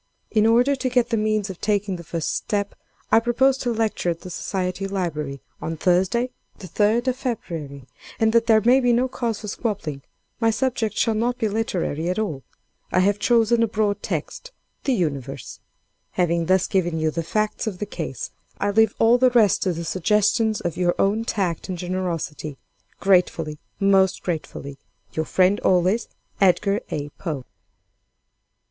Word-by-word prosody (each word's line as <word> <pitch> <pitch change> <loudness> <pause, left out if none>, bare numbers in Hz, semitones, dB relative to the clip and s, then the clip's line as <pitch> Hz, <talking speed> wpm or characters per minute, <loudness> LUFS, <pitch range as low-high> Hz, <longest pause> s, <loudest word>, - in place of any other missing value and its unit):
In 215 0 +4
order 245 +5 +4
to 260 -1 -2
get 245 -1 +2
the - - +3
means 215 -2 0
of 185 - -12
taking 205 -2 0
the 170 - -8
first 165 0 -2
step, 200 -1 -2 0.4
I - - +7
propose 240 +3 +3
to 245 - -1
lecture 220 -5 0
at 165 -1 -3
the 185 - -8
Society 185 +1 -3
Library, 150 -8 -3 0.2
on 165 0 -4
Thursday, 190 +9 +2 0.3
the 190 - -9
3d 220 +7 +2
of 250 - -1
February, 160 - -5 0.3
and, 220 0 +3
that 230 0 +3
there 220 -1 +5
may 245 +5 +5
be 245 -2 +3
no 250 +2 +2
cause 235 -4 -3
of 210 - -4
squabbling, 190 - -3 0.4
my 225 -1 +3
subject 225 -2 -1
shall 225 - +2
not 240 +3 0
be 225 - 0
literary 185 -7 -1
at 185 - -1
all. 195 -11 -2 0.5
I 185 - +3
have 200 +2 +2
chosen 235 0 +3
a 230 - +3
broad 210 -1 0
text: - - -4 0.3
'The 270 - +2
Universe.' 140 - -3 0.5
"Having 170 -2 +1
thus 185 0 +3
given 175 -4 0
you 160 0 +1
the 165 - -2
facts 215 +7 -1
of 200 -4 -3
the 210 - -3
case, 160 -9 -5 0.3
I 205 - +1
leave 220 +1 +3
all 235 +2 +5
the 255 0 +5
rest 230 -5 +4
to 185 - +1
the 170 +1 -5
suggestions 210 +4 +2
of 175 -2 -3
your 175 -1 +2
own 210 +3 +1
tact 185 -6 -2
and 185 - -3
generosity. 170 -5 -3 0.4
Gratefully, 175 -5 +2 0.2
most 195 -2 +3
gratefully, 140 -5 -5 0.3
"Your 160 - -1
friend 185 +4 +3
always, 185 +5 +2 0.3
"EDGAR 195 +2 +3
A. 145 0 -3
POE." 150 -8 -4
200 Hz, 170 wpm, -23 LUFS, 170-225 Hz, 0.5 s, I